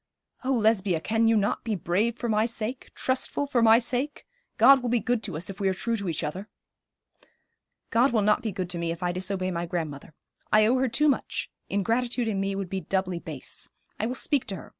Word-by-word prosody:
'Oh, 265 +1 +1
Lesbia, 210 -7 +2
can 225 +6 +1
you 225 0 +4
not 205 0 0
be 225 -2 -1
brave 200 +7 0
for 240 - -3
my 215 0 +2
sake 235 +2 -4
trustful 260 +2 0
for 260 -4 +1
my 225 0 +7
sake? 250 +4 -2 0.3
God 265 +4 +7
will 245 - -2
be 240 0 +2
good 240 0 0
to 185 -7 -4
us 170 - -3
if 195 - -7
we 195 -1 +2
are 190 - -1
true 230 +4 -1
to 200 -4 -3
each 160 - -2
other.' 190 +8 -5 1.4
'God 245 +4 +4
will 220 -3 +2
not 210 +1 +3
be 220 - -2
good 180 -1 -4
to 175 - -3
me 170 0 -1
if 170 +2 -5
I 175 - +1
disobey 185 +1 -2
my 170 0 -3
grandmother. 160 -3 -5 0.4
I 215 0 +6
owe 250 +4 +3
her 260 0 +1
too 300 +6 +2
much; 280 - -1 0.2
ingratitude 235 +4 0
in 205 -3 -1
me 195 0 -1
would 195 -1 -3
be 190 +1 -3
doubly 185 -2 -1
base. 155 -6 -6 0.3
I 220 - 0
will 250 - -3
speak 285 0 +1
to 195 - -3
her. - - -10
215 Hz, 225 wpm, -27 LUFS, 185-240 Hz, 1.4 s, my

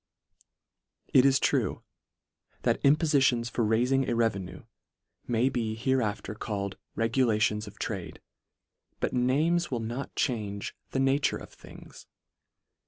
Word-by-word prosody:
It 130 0 +7
is 135 -1 +4
true, - - 0 0.8
that - - +1
impofitions 140 -5 +3
for 120 - 0
railing 125 +5 +2
a 120 - +1
revenue, 100 -6 -1 0.6
may 120 +1 +2
be 115 -4 -1
hereafter 110 -4 -1
called 100 -2 -4 0.2
regulations 110 -2 +1
of 100 - -11
trade, 90 -7 -5 0.8
but - - -1
names 150 +8 +2
will 125 -4 -2
not 120 +5 -5
change 105 -5 -2
the 135 - -2
na 135 +1 +3
ture - - +1
of - - -12
things. - - -14
120 Hz, 120 wpm, -28 LUFS, 105-135 Hz, 0.8 s, It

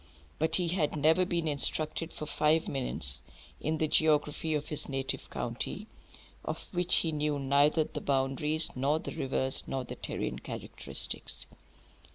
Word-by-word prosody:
But 160 +1 +2
he 175 -2 +2
had 165 -4 +1
never 160 +5 +4
been 170 -2 -1
instructed 155 +2 +2
for 150 - -6
five 155 +1 +2
minutes 70 - -2 0.4
in 155 +1 -1
the 155 - +1
geography 155 0 +2
of 150 0 -3
his 150 - -2
native 135 -1 -2
county, 125 - -3 0.6
of - - -4
which 180 -1 +4
he 165 - +3
knew 150 -1 0
neither 140 +3 +3
the 155 - -6
boundaries 140 +3 0
nor 140 +4 +2
the - - -6
rivers 130 0 +1
nor 135 -1 -2
the - - -7
terrene - - -3
characteristics. - - -4
150 Hz, 150 wpm, -30 LUFS, 135-160 Hz, 0.6 s, never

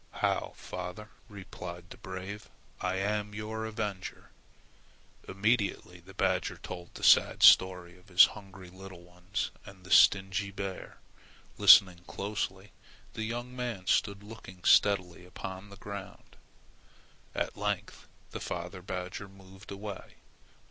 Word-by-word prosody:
"How, - - -1
father," 90 +4 -7 0.2
replied 90 -3 -9
the - - -10
brave; 95 +2 -7 0.3
"I 95 0 -1
am 105 +1 -2
your 110 +1 -4
avenger!" 105 -4 -5 1.0
Immediately 100 -3 0
the 95 +2 -16
badger 95 -2 0
told 90 -1 -9
the - - -9
sad - - +5
story 90 -1 +6
of 90 - -24
his 95 -1 +8
hungry 95 -4 -12
little 95 -1 -11
ones 90 +5 -4
and 95 -2 -14
the 95 - -12
stingy 95 0 +5
bear. 100 -1 -6 0.6
Listening 90 -3 +8
closely 100 -1 -4 0.4
the 110 - -3
young 120 +2 -5
man 120 -7 -4
stood 100 +1 +1
looking 105 -4 -12
steadily 90 -4 +3
upon 95 +2 -8
the 100 - -12
ground. 100 -2 -9 1.0
At - - -2
length - - -3 0.2
the - - -5
father 90 +1 -5
badger 90 +1 -5
moved 95 +1 -15
away. 100 0 -8
95 Hz, 125 wpm, -30 LUFS, 90-105 Hz, 1.0 s, his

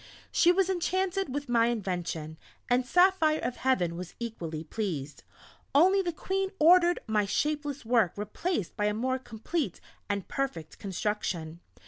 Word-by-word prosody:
She 350 - +5
was 375 0 +2
enchanted 375 -1 0
with 285 +1 -3
my 235 -1 +3
invention, 175 -8 -3 0.3
and 250 +1 +3
Saphire 355 -2 +4
of 250 - -2
Heaven 180 -11 +1
was 180 0 -7
equally 170 -10 -5
pleased; 155 -6 -4 0.5
only 375 +6 +6
the 355 -2 -1
Queen 385 +3 -2
ordered 350 +2 +6
my 210 -2 +1
shapeless 290 +4 -1
work 225 -6 +3
replaced 210 - -3
by 210 - 0
a 210 0 +1
more 260 +3 0
complete 245 - -3 0.3
and 200 -2 -2
perfect 270 - -4
construction. 185 -5 -3
240 Hz, 140 wpm, -29 LUFS, -, 0.5 s, only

